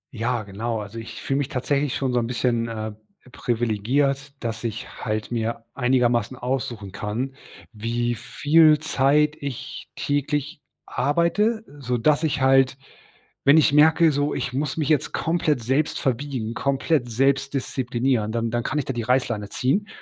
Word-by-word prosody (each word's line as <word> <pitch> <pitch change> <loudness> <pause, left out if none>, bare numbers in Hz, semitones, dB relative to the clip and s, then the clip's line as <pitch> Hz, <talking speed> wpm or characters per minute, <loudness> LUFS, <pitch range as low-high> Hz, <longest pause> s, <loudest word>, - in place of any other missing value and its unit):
Ja, 115 0 -1
genau. 110 +3 -3
Also, 105 +2 -7
ich 115 - -8
fühle 135 - 0
mich 140 - -1
tatsächlich 140 0 0
schon 130 -2 -1
so 125 - +3
'n 115 - -1
bisschen, 120 -1 0
äh, 110 -1 -4 0.4
privilegiert, 125 +5 0
dass 115 -1 -3
ich 115 -1 -4 0.2
halt 110 +1 -2
mir 115 0 -2
einigermaßen 125 -2 +1
aussuchen 120 -6 -3
kann, 105 +7 -3 0.4
wie 120 +2 -1
viel 150 +6 +4
Zeit 150 0 +2
ich 140 -4 -6
täglich 145 +1 -2 0.2
arbeite, 170 - +1 0.2
sodass 130 +4 +1
ich 145 -3 0
halt 135 0 +4 0.7
wenn 140 +2 +7
ich 155 -2 +5
merke 160 +2 +5
so, 145 +1 0
ich 120 - -3
muss 140 +2 -2
mich 155 -2 -1
jetzt 150 -4 +1
komplett 160 -6 0
selbst 135 +6 0
verbiegen, 130 -3 -2
komplett 135 +1 0
selbst 135 +3 +1
disziplinieren, 125 -4 0
dann 115 0 -1
dann 120 +1 -1
kann 150 - -2
ich 145 - 0
da 135 - -3
die 120 -2 -3
Reißleine 120 -4 0
ziehen 140 - 0
130 Hz, 155 wpm, -24 LUFS, 115-145 Hz, 0.7 s, wenn